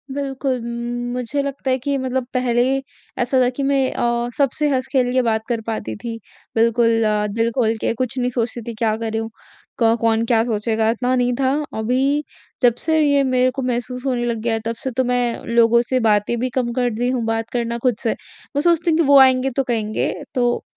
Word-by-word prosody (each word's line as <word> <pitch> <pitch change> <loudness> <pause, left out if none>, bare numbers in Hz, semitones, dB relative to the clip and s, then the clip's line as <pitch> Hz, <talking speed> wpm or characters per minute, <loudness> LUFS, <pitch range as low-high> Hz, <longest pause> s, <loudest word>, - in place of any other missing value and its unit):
बिल्कुल। 270 -1 -2
उम, 240 +1 -4
मुझे 250 +3 -2
लगता 275 -1 -3
है 255 - +2
कि 280 -1 +1
मतलब 260 0 -1
पहले 245 -1 +2 0.6
ऐसा 255 +2 +1
था 250 - +3
कि 280 - -1
मैं 275 0 +2
अ, 235 0 0
सबसे 290 +2 +1
हँस-खेल 255 -2 0
के 255 - +3
बात 220 0 +1
कर 230 -2 -1
पाती 110 - -4
थी, 230 - -6 0.4
बिल्कुल 230 0 +3
अ, 210 -1 +1
दिल 230 +1 +2
खोल 225 -2 +2
के - - +1
कुछ 255 +1 -2
नहीं 250 0 +1
सोचती 235 +1 -2
थी - - -4
क्या 215 -1 +2
कर 225 -1 -3
रहीं 225 0 -1
हूँ, 225 - -5 0.5
क 230 -1 +4
कौन 225 0 +2
क्या 225 -2 +4
सोचेगा? 220 -1 0
इतना 245 +3 0
नहीं 245 0 +1
था, 265 -1 +2 0.3
अभी 265 +6 +1 0.4
जब 245 -2 +5
से 320 -1 +3
ये 285 -2 +3
मेरे 255 -1 +2
को 270 - -2
महसूस 250 +1 -3
होने 245 -2 0
लग 235 -1 -1
गया 235 - +1
है 225 - 0
तब 230 +1 -2
से 260 +3 -5
तो 255 +2 0
मैं 245 -1 0
लोगों 235 0 +4
से 260 -1 +2
बातें 210 +2 +2
भी 255 +2 -1
कम 245 -2 0
कर 245 0 +1
दी 245 +3 -1
हूँ 250 -2 -1
बात 225 0 -2
करना 235 -1 -2
खुद 250 -3 +2
से। 225 - +1 0.4
मैं 285 - +2
सोचती 340 0 +2
हूँ 315 - +2
कि 335 - +3
वो 280 -1 +7
आएँगे 260 0 +5
तो 270 - +3
कहेंगे 220 -4 -1 0.2
तो 245 -1 +1
245 Hz, 220 wpm, -20 LUFS, 230-260 Hz, 0.6 s, वो